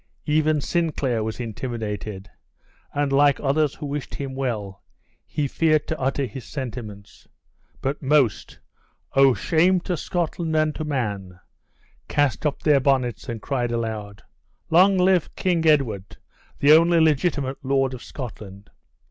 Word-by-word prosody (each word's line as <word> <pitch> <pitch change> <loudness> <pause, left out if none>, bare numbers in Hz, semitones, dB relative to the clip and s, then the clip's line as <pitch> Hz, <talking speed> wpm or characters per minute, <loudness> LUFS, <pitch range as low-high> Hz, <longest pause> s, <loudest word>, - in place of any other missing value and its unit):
Even 155 0 +2
Sinclair 140 -9 -1
was 110 +2 -4
intimidated, 105 -4 -5 0.6
and 145 -1 -1
like 140 0 +4
others 145 +1 +1
who 150 - -7
wished 145 0 -5
him 135 -2 -5
well, 110 -8 -4 0.4
he 145 -2 -1
feared 155 +1 +2
to 160 - -3
utter 135 +1 0
his 130 0 -8
sentiments. 115 -7 -8 0.5
But 140 +2 -2
most, 135 -7 +1 0.6
oh! 135 -2 +5
shame 180 +3 +3
to 180 - -2
Scotland 165 -1 -2
and 155 -1 +2
to 155 - -5
man, 100 -11 -3 0.7
cast 145 0 +1
up 145 - -4
their 150 -3 +5
bonnets 130 -4 0
and 115 -3 -5
cried 125 -4 -1
aloud, 110 -3 -4 0.5
"Long 190 +4 +5
live 180 -2 +2
Kind 170 -3 +1
Edward, 115 -11 +1 0.4
the 145 - +4
only 165 +2 +6
legitimate 145 -3 +1
Lord 135 -1 +1
of 125 - -8
Scotland!" 105 -6 -9
135 Hz, 135 wpm, -23 LUFS, 115-155 Hz, 0.7 s, only